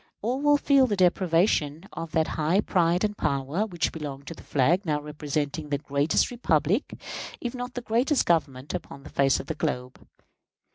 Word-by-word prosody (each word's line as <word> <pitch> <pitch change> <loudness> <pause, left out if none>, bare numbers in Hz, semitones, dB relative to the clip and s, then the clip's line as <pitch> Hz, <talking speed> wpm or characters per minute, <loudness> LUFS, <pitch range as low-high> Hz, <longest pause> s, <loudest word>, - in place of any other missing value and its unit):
All 250 +5 -1
will 290 0 +5
feel 275 -2 +4
the 210 - 0
deprivation 175 -3 +2
of 165 -1 -6
that 160 0 +2
high 160 +5 +1
pride 175 -3 +2
and 210 -1 0
power 140 +7 -1
which 175 -5 -1
belong 145 -3 -6
to 165 - -7
the - - -13
flag 155 +8 +2
now 150 -5 0
representing 150 0 -3
the 145 - +1
greatest 145 - +1
republic, 190 - 0 0.4
if 240 0 -4
not 245 0 -6
the 245 - -3
greatest 250 +5 +2
Government, 140 -5 0
upon 140 0 -6
the - - -11
face 135 -1 +3
of - - -6
the 160 - -3
globe. 130 -5 -3
165 Hz, 180 wpm, -26 LUFS, 145-210 Hz, 0.4 s, will